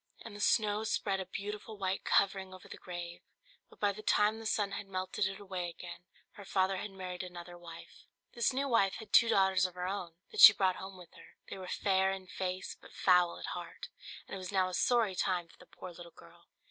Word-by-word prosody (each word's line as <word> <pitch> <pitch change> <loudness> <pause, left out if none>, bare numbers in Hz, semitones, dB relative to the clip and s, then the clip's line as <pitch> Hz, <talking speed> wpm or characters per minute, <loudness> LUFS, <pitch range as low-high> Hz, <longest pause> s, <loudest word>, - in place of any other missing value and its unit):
And 220 -3 -8
the - - -9
snow 210 0 +2
spread 200 -3 0
a 190 - -5
beautiful 210 +2 -6
white 190 -1 -2
covering 190 -1 +1
over 185 - -14
the - - -8
grave: 175 -1 -7 0.5
but - - -19
by 205 -1 +2
the 205 +2 -8
time 215 +1 +2
the 225 - -5
sun 205 -2 0
had 200 0 -5
melted 185 0 -1
it 195 0 -6
away 185 -3 -4
again, 175 +1 -10 0.3
her 205 - -12
father 190 0 +1
had 210 - -4
married 185 -2 -6
another 175 -1 -8
wife. 170 -1 -12 0.3
This 235 -2 +1
new 275 +2 -1
wife 215 -7 +3
had 220 - -10
two 230 - +7
daughters 190 -3 +4
of 180 - -14
her 180 0 -3
own, 185 -4 -4 0.2
that 430 - -6
she 205 - +12
brought 190 -2 +1
home 190 0 -8
with 180 -2 -14
her: - - -16
they - - -6
were 185 - -7
fair 190 0 +2
in 190 -1 -5
face 185 0 -4
but - - -15
foul 180 -2 +4
at - - -7
heart, - - -7 0.4
and - - -10
it 195 - -4
was 185 +1 -6
now 190 -2 +2
a - - -8
sorry 225 +2 +2
time 180 -2 0
for - - -21
the - - -16
poor 185 - -10
little 170 0 -11
girl. 170 +1 -18
190 Hz, 230 wpm, -33 LUFS, 180-205 Hz, 0.5 s, she